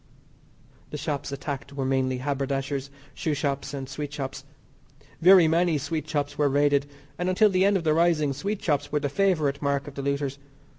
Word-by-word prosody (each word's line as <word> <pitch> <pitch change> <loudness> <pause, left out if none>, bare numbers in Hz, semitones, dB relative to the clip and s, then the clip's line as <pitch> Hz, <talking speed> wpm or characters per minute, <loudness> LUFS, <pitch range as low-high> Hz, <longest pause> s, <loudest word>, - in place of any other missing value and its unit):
The 150 - -5
shops 145 -1 -3
attacked 140 0 -5
were 135 -1 -2
mainly 130 -1 +1
haberdashers, 135 0 -2 0.2
shoe 155 -2 -2
shops, 140 -1 -2
and 135 -2 -5
sweet 145 +2 -5
shops. 135 -2 -5 0.8
Very 180 -1 +8
many 165 0 +2
sweet 155 +2 -4
shops 145 -1 -2
were 145 -1 +3
raided, 145 0 +2 0.3
and 175 +1 0
until 205 +3 +4
the 185 0 +3
end 200 0 +4
of 175 - -4
the 155 -1 +3
rising 160 -3 +2
sweet 200 +9 -3
shops 145 -2 0
were 150 - +1
the 145 - -2
favourite 155 -5 +1
mark 140 -1 0
of 145 - -8
the 140 - -5
looters. 140 0 -2
145 Hz, 185 wpm, -26 LUFS, 140-160 Hz, 0.8 s, Very